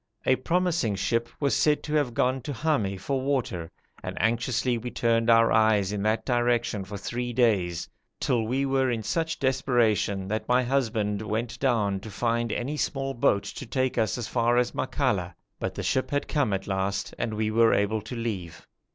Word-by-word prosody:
A 130 - +4
promising 170 - 0
ship 115 +4 0
was 140 -2 +1
said 150 -1 +2
to 150 - -4
have 145 -6 +1
gone 130 +1 +1
to 145 - -5
Hami 110 -9 0
for 135 +7 -2
water, 125 -12 -1 0.3
and - - -6
anxiously 120 +3 +1
we 120 +1 -4
turned 115 -1 +1
our 115 0 +6
eyes 105 -3 +3
in 105 -1 -2
that 110 +2 0
direction 120 -4 +1
for 100 +2 -7
three 120 +4 -3
days, 95 -8 +1 0.3
till 120 - +1
we 135 +4 0
were 135 -1 +1
in 115 -3 -2
such 165 +8 -1
desperation 120 -7 +1
that 110 +2 -3
my 125 +1 +3
husband 110 -6 0
went 115 +3 -3
down 105 -7 +1
to 110 - -9
find 115 +2 -1
any 140 +8 -2
small 135 -2 -2
boat 100 -5 +2
to 140 - -7
take 130 +1 0
us 110 +1 +1
as 120 -2 -4
far 120 0 +2
as 125 0 +2
Makalla, 100 - -1 0.2
but - - -3
the - - -4
ship 130 - 0
had 145 0 -1
come 145 -8 +1
at 95 0 -2
last 95 0 -2
and 110 -2 -2
we 110 0 0
were 115 +1 +5
able 105 +2 +1
to 115 +4 -7
leave. 100 -8 -5
115 Hz, 190 wpm, -26 LUFS, 105-130 Hz, 0.3 s, our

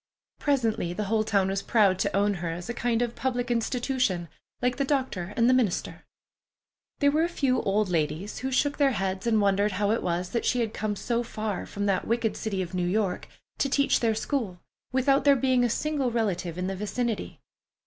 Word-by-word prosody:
Presently 230 - 0
the 210 - -2
whole 215 +2 +1
town 200 -3 +1
was 195 0 -1
proud 200 -4 +3
to - - 0
own 205 +1 +3
her 170 - -2
as 170 +1 -5
a 240 - -3
kind 240 -1 0
of 240 -1 -3
public 245 -1 -1
institution, 240 - 0 0.3
like 250 0 0
the 275 - +1
doctor 260 -10 -1
and 230 0 +4
the 255 - +5
minister. 240 -8 0 0.9
There 285 -1 +3
were 305 +2 +2
a 340 - +1
few 270 -7 +1
old 205 +1 +1
ladies 160 +3 -2
who 265 +1 -3
shook 285 +3 +1
their 275 -2 +4
heads 195 0 -2
and 220 -2 +3
wondered 200 0 +2
how 205 +2 +1
it 225 - +1
was 180 +1 -1
that 235 - -1
she 250 - +1
had 220 -2 -2
come 210 -1 -2
so 235 +4 -1
far, 215 -4 -4
from 205 0 -3
that 195 -2 0
wicked 230 -1 0
city 195 -4 -2
of 170 - -9
New 180 -1 0
York, 195 -1 -1 0.3
to 275 - +1
teach 280 +1 +3
their 225 -2 +1
school, 220 -6 -2 0.3
without 270 +2 +3
there 280 0 +6
being 255 -1 +2
a 240 - +2
single 285 +1 0
relative 190 -7 -1
in 180 - -2
the 190 +1 -2
vicinity. 220 +3 -3
220 Hz, 210 wpm, -27 LUFS, 195-250 Hz, 0.9 s, there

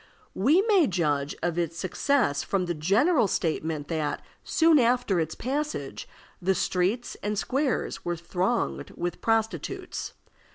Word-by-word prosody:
We 300 - +4
may 400 -9 +4
judge 150 -6 0
of 175 0 0
its 165 -1 -2
success 185 - +1
from 190 -2 -1
the 175 - -1
general 210 - +3
statement 160 -4 -1
that, 155 -3 -2 0.2
soon 325 -2 +4
after 240 -6 +2
its 160 -1 -2
passage, 290 +4 -3 0.3
the 190 +2 +2
streets 190 +9 0
and 210 0 -2
squares 255 -5 -1
were 175 0 -1
thronged 180 +7 -1
with 175 0 -3
prostitutes. 225 -1 -1
195 Hz, 130 wpm, -27 LUFS, 170-250 Hz, 0.3 s, We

